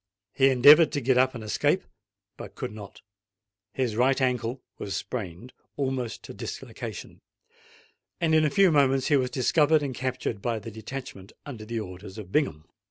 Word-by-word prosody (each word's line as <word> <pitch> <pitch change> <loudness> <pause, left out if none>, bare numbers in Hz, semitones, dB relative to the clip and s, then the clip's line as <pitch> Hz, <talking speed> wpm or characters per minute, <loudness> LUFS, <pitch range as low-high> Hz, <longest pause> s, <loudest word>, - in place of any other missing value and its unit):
He 135 0 +4
endeavoured 145 +5 +7
to 145 - 0
get 130 -1 +2
up 130 0 +2
and 115 - -7
escape—but 110 - -4
could - - -5
not: 105 -2 -11 0.7
his 125 -3 -2
right 130 +4 +3
ankle 125 -1 -1 0.2
was 100 - -4
sprained, 110 +1 -6 0.2
almost 130 -4 -3
to - - -9
dislocation; - - -8 1.0
and 165 -2 +1
in 155 0 +5
a 150 - +3
few 195 +3 +4
minutes 135 -3 +3
he 145 - +4
was 130 -2 +1
discovered 150 +4 +3
and 135 -2 -3
captured 125 -4 -3
by 115 0 -1
the 110 +1 -8
detachment 110 -3 -8
under 120 -7 -8
the 115 +1 -3
orders 95 0 -9
of 100 -4 -9
Bingham. 115 - 0
125 Hz, 165 wpm, -26 LUFS, 110-135 Hz, 1.0 s, endeavoured